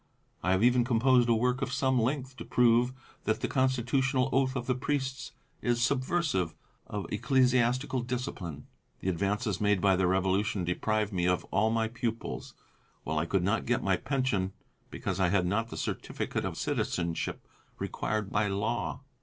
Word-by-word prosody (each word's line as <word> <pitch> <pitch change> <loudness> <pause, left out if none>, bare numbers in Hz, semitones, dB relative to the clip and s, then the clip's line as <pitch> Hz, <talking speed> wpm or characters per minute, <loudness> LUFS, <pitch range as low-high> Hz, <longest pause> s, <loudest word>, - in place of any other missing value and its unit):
I 90 - -1
have 95 +3 +2
even 125 0 +5
composed 120 0 +3
a 115 - +5
work 125 +3 +1
of 130 -2 -1
some 130 -2 +2
length, 130 +2 -1
to - - -6
prove 120 0 +3 0.3
that 110 - 0
the - - 0
Constitutional 130 0 +1
oath 135 0 +2
of 125 -2 -2
the 130 - +1
Priests 130 -1 -2 0.3
is 120 -1 +1
subversive 130 - +1 0.3
of 105 -2 -4
Ecclesiastical 130 +1 +2
discipline. 110 - -4 0.4
The 95 - 0
advances 100 +2 -1
made 105 -1 +3
by 95 0 +4
the 90 0 +2
Revolution 95 +1 +1
deprived 105 +4 0
me 90 -1 +1
of 90 0 +1
all 110 +2 +3
my 115 0 +1
pupils, 115 0 -4 0.5
while 80 0 -1
I 85 - -1
could 95 -1 +1
not 100 +4 0
get 120 0 +1
my 95 -1 +3
pension 125 -8 -1 0.4
because 95 0 -3
I 95 - +4
had 95 -1 +2
not 105 +5 0
the - - -7
certificate - - -3
of - - -4
citizenship 85 -2 -2 0.3
required 105 -2 -2
by 105 0 +2
law. 100 +1 -2
115 Hz, 165 wpm, -30 LUFS, 95-130 Hz, 0.5 s, even